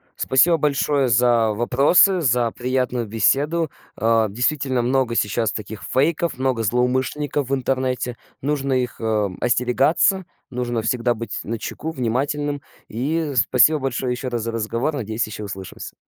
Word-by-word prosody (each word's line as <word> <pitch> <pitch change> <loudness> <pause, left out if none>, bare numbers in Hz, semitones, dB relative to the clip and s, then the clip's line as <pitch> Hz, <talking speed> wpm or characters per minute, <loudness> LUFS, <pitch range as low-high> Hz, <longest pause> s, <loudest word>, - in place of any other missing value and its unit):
Спасибо 165 +6 +3
большое 145 -2 +1
за 120 -1 +3
вопросы, 140 - +4
за 120 -4 +2
приятную 125 -1 -1
беседу, 140 +9 +1 0.3
э. 115 0 +2
Действительно, 130 +3 0
много 125 -1 +1
сейчас 110 +1 0
таких 110 -1 -7
фейков, 155 +2 +1
много 130 -3 0
злоумышленников 130 +4 0
в 140 - +2
интернете. 130 -2 -2 0.2
Нужно 140 -1 -1
их, 125 -1 -1
э, - - -8
м, 105 -4 0
остерегаться, 135 - +2 0.2
нужно 120 -2 -2
всегда 120 +2 0
быть 115 0 -5
начеку, 115 +7 -5
внимательным. 145 +2 -2 0.3
И 145 +6 -2
спасибо 150 +5 +4
большое 130 -1 -2
ещё 125 +1 -4
раз 120 -3 -3
за 115 - -3
разговор. 115 +6 -2
Надеюсь, 115 -4 -2
ещё 105 0 -7
услышимся. 95 -2 -8
125 Hz, 140 wpm, -21 LUFS, 115-140 Hz, 0.3 s, вопросы